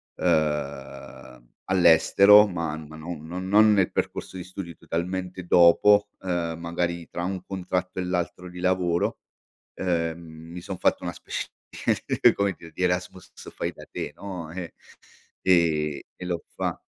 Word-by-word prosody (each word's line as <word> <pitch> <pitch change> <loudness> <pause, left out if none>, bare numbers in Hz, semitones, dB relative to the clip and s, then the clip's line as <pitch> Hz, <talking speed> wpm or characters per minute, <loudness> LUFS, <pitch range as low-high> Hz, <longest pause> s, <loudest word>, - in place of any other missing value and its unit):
uhm, 70 -5 -2 0.2
all'estero, 95 +3 +7
ma 85 -5 -3
ma 80 0 -10
non 80 -1 -7
non 90 +3 -5
non 105 +2 +6
nel 95 -3 +3
percorso - - -3
di 90 - -5
studio, 90 -2 -8
totalmente 90 +2 -4
dopo, 100 +4 +6
ehm, 85 -3 -2
magari 85 0 -2
tra 85 - -5
un 95 0 -3
contratto 90 -1 -3
e - - -1
l'altro 90 0 -3
di 90 0 -10
lavoro, 90 -2 +1 0.6
ehm, 85 -3 -1
mi 80 +1 -10
son 95 +1 -6
fatto - - +1
una - - -3
specie - - -5 0.6
di - - +4
come 100 -1 0
dir 85 - -12
di 90 - -5
Erasmus 90 0 -2 0.2
fai - - -3
da - - -12
te - - -5
no, 90 -5 -7
eh. 90 -2 -6 0.7
Ehm, 80 -5 +2 0.2
e 90 - -8
l'ho 85 -2 -3
fa - - -2
90 Hz, 150 wpm, -25 LUFS, 85-95 Hz, 0.7 s, all'estero